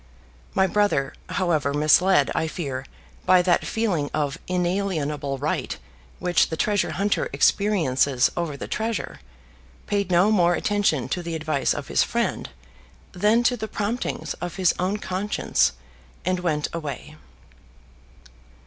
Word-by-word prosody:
My 190 Hz, -, +4 dB
brother, 190 Hz, -9 st, +1 dB, 0.2 s
however, 155 Hz, -6 st, 0 dB
misled, 155 Hz, +1 st, +4 dB
I 160 Hz, -, 0 dB
fear, 140 Hz, -5 st, -5 dB, 0.4 s
by 185 Hz, -1 st, +6 dB
that 175 Hz, -1 st, +2 dB
feeling 185 Hz, -11 st, 0 dB
of 145 Hz, -3 st, -1 dB
inalienable 175 Hz, -6 st, -1 dB
right 145 Hz, +3 st, -2 dB, 0.4 s
which 180 Hz, -1 st, +2 dB
the 160 Hz, -, -4 dB
treasure 205 Hz, +1 st, +1 dB
hunter 200 Hz, +2 st, 0 dB
experiences 145 Hz, -10 st, +2 dB
over 170 Hz, -5 st, -3 dB
the -, -, -6 dB
treasure, 225 Hz, +1 st, -3 dB, 0.7 s
paid 200 Hz, -2 st, -1 dB
no 180 Hz, +4 st, +4 dB
more 175 Hz, -4 st, +4 dB
attention 200 Hz, -12 st, +1 dB
to 180 Hz, -, -2 dB
the 170 Hz, -1 st, -4 dB
advice 155 Hz, -3 st, 0 dB
of -, -, -6 dB
his -, -, +2 dB
friend -, -, -1 dB, 0.6 s
than 210 Hz, +6 st, +2 dB
to 245 Hz, -, +3 dB
the 220 Hz, -2 st, -5 dB
promptings 215 Hz, +4 st, -3 dB
of 175 Hz, -1 st, -4 dB
his 185 Hz, -3 st, +3 dB
own 185 Hz, +3 st, 0 dB
conscience, 195 Hz, +1 st, 0 dB, 0.5 s
and 185 Hz, 0 st, +1 dB
went 155 Hz, -4 st, 0 dB
his 165 Hz, -, -3 dB
way. 150 Hz, +1 st, -7 dB
175 Hz, 135 wpm, -24 LUFS, 150-200 Hz, 0.7 s, by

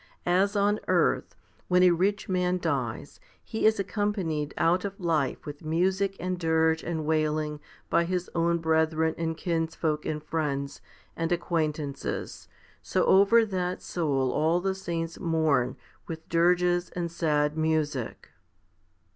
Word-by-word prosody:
As 190 Hz, +4 st, +2 dB
on 205 Hz, +1 st, +2 dB
earth, -, -, +1 dB, 0.3 s
when 180 Hz, 0 st, +4 dB
a 180 Hz, -, +7 dB
rich 195 Hz, +6 st, 0 dB
man 180 Hz, -1 st, +1 dB
dies, 140 Hz, -6 st, -3 dB, 0.2 s
he 220 Hz, -1 st, +1 dB
is 220 Hz, -1 st, +3 dB
accompanied 190 Hz, -8 st, -1 dB
out 175 Hz, +3 st, +2 dB
of 200 Hz, -1 st, -5 dB
life 160 Hz, -6 st, 0 dB
with 145 Hz, +1 st, -8 dB
music 190 Hz, +5 st, 0 dB
and 185 Hz, 0 st, -3 dB
dirge 160 Hz, -1 st, +2 dB
and 160 Hz, -3 st, -3 dB
wailing 155 Hz, -1 st, 0 dB, 0.3 s
by 170 Hz, -, +2 dB
his 180 Hz, 0 st, -2 dB
own 170 Hz, 0 st, +2 dB
brethren 160 Hz, 0 st, +1 dB
and 165 Hz, -1 st, -2 dB
kinsfolk 165 Hz, -3 st, -1 dB
"and 150 Hz, -1 st, -3 dB
friends 140 Hz, -3 st, -3 dB, 0.3 s
and 165 Hz, +1 st, -2 dB
acquaintances, 155 Hz, -4 st, -2 dB, 0.3 s
so -, -, 0 dB
over 200 Hz, +4 st, +5 dB
that 185 Hz, -3 st, -3 dB
soul 140 Hz, -6 st, 0 dB
all 160 Hz, +3 st, +2 dB
the 190 Hz, +1 st, -1 dB
saints 170 Hz, -3 st, -4 dB
mourn 155 Hz, -7 st, +1 dB, 0.3 s
with 160 Hz, -1 st, -7 dB
dirges 175 Hz, +1 st, +2 dB
and 170 Hz, -2 st, -2 dB
sad 150 Hz, -3 st, +1 dB
music. 155 Hz, -5 st, -1 dB
165 Hz, 135 wpm, -27 LUFS, 155-180 Hz, 0.3 s, a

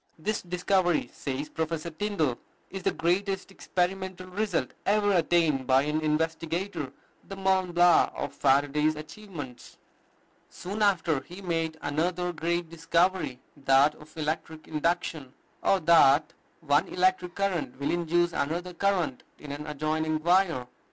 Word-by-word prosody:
This 205 Hz, +6 st, -2 dB
discovery, 180 Hz, 0 st, +1 dB
says 140 Hz, +1 st, -4 dB
Professor 160 Hz, +1 st, -3 dB
Tyndall, 160 Hz, -, -1 dB, 0.3 s
"is 195 Hz, -, -5 dB
the -, -, +1 dB
greatest 195 Hz, +3 st, -1 dB
experimental 185 Hz, 0 st, -2 dB
result 185 Hz, -, -1 dB
ever 205 Hz, 0 st, +2 dB
attained 165 Hz, -6 st, +2 dB
by 130 Hz, +1 st, +5 dB
an 150 Hz, +1 st, -1 dB
investigator, 160 Hz, 0 st, -1 dB, 0.4 s
the 195 Hz, -, -6 dB
Mont 190 Hz, -2 st, +1 dB
Blanc 175 Hz, 0 st, +5 dB
of -, -, -4 dB
Faraday's 145 Hz, +3 st, +2 dB
achievements." 155 Hz, -, -9 dB, 0.7 s
Soon 200 Hz, +4 st, -6 dB
after 170 Hz, -7 st, +2 dB
he 175 Hz, +7 st, -11 dB
made 165 Hz, -2 st, -1 dB
another 175 Hz, +4 st, -1 dB
great 170 Hz, +1 st, -1 dB
discovery, 165 Hz, -3 st, 0 dB, 0.2 s
that 140 Hz, +1 st, +4 dB
of 155 Hz, +2 st, -17 dB
electric 155 Hz, 0 st, -3 dB
induction, 155 Hz, -3 st, -2 dB, 0.3 s
or 195 Hz, -, +3 dB
that 155 Hz, -2 st, +5 dB, 0.3 s
one 150 Hz, +3 st, +2 dB
electric 180 Hz, -1 st, +1 dB
current 170 Hz, -10 st, -2 dB
will 140 Hz, -, 0 dB
induce 175 Hz, 0 st, +1 dB
another 170 Hz, +5 st, -2 dB
current 180 Hz, -7 st, 0 dB, 0.2 s
in 145 Hz, -, -9 dB
an 150 Hz, +2 st, -6 dB
adjoining 155 Hz, +1 st, -1 dB
wire. 175 Hz, -7 st, +3 dB
165 Hz, 130 wpm, -28 LUFS, 150-180 Hz, 0.7 s, by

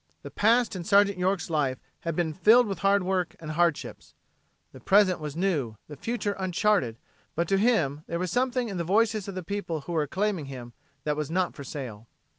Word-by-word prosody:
The -, -, -8 dB
past 230 Hz, +1 st, +3 dB
in 180 Hz, -, -4 dB
Sergeant 200 Hz, 0 st, +4 dB
York's 185 Hz, -1 st, 0 dB
life 145 Hz, -6 st, 0 dB, 0.2 s
had 165 Hz, -2 st, -3 dB
been 160 Hz, -2 st, 0 dB
filled 225 Hz, +8 st, +6 dB
with 195 Hz, -5 st, -4 dB
hard 195 Hz, 0 st, +3 dB
work 180 Hz, -2 st, -1 dB
and 155 Hz, -1 st, -6 dB
hardships, 170 Hz, -1 st, -1 dB, 0.6 s
the -, -, -12 dB
present 195 Hz, -3 st, +4 dB
was 150 Hz, -2 st, -6 dB
new, 160 Hz, -, 0 dB
the 150 Hz, -, -9 dB
future 205 Hz, -, -2 dB
uncharted, 185 Hz, -, +1 dB, 0.4 s
but 170 Hz, +1 st, 0 dB
to 195 Hz, -, +3 dB
him 160 Hz, -, +2 dB
there 170 Hz, -, -2 dB
was 180 Hz, 0 st, -2 dB
something 250 Hz, +1 st, 0 dB
in 195 Hz, -4 st, -4 dB
the 170 Hz, -, -1 dB
voices 215 Hz, +3 st, +1 dB
of 200 Hz, -, -6 dB
the 185 Hz, -, -4 dB
people 170 Hz, -4 st, -3 dB
who 175 Hz, -, -8 dB
were 165 Hz, -2 st, +1 dB
acclaiming 190 Hz, +2 st, -1 dB
him 125 Hz, -3 st, -9 dB, 0.3 s
that 150 Hz, -1 st, 0 dB
was 150 Hz, -1 st, -3 dB
not 180 Hz, +2 st, 0 dB
for 140 Hz, -, -9 dB
sale. 120 Hz, -5 st, -7 dB
180 Hz, 205 wpm, -27 LUFS, 155-200 Hz, 0.6 s, filled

